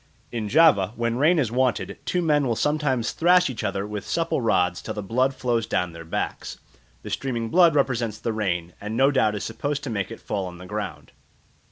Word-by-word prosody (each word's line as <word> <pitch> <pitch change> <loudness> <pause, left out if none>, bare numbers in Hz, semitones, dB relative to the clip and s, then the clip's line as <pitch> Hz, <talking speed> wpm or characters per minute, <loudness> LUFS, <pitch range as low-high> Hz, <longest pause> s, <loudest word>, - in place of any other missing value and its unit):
In 110 -3 -3
Java, 110 - +5
when 115 +1 -1
rain 165 +5 +4
is 125 -8 +1
wanted, 125 -1 0
two 180 -1 0
men 150 -4 +2
will 115 - 0
sometimes 145 -4 0
thrash 180 -2 +4
each 120 - -6
other 100 0 -2
with 105 -1 -6
supple 165 -4 0
rods 90 -6 +1
till - - -6
the 105 - -4
blood 130 +7 +1
flows 120 -3 -1
down 90 -6 -1
their 85 0 -9
backs; 80 - -4 0.5
the - - -7
streaming 120 -4 -2
blood 170 -1 +5
represents 120 -6 0
the 115 - -3
rain, 90 -5 -2
and 105 +2 -4
no 135 +2 +5
doubt 110 -6 +2
is 105 - -4
supposed 145 +6 -3
to 135 - -4
make 100 -4 -2
it 115 - -8
fall 100 -2 -3
on 90 -1 -9
the 90 - -11
ground. 105 +3 -6
115 Hz, 210 wpm, -24 LUFS, 105-140 Hz, 0.5 s, Java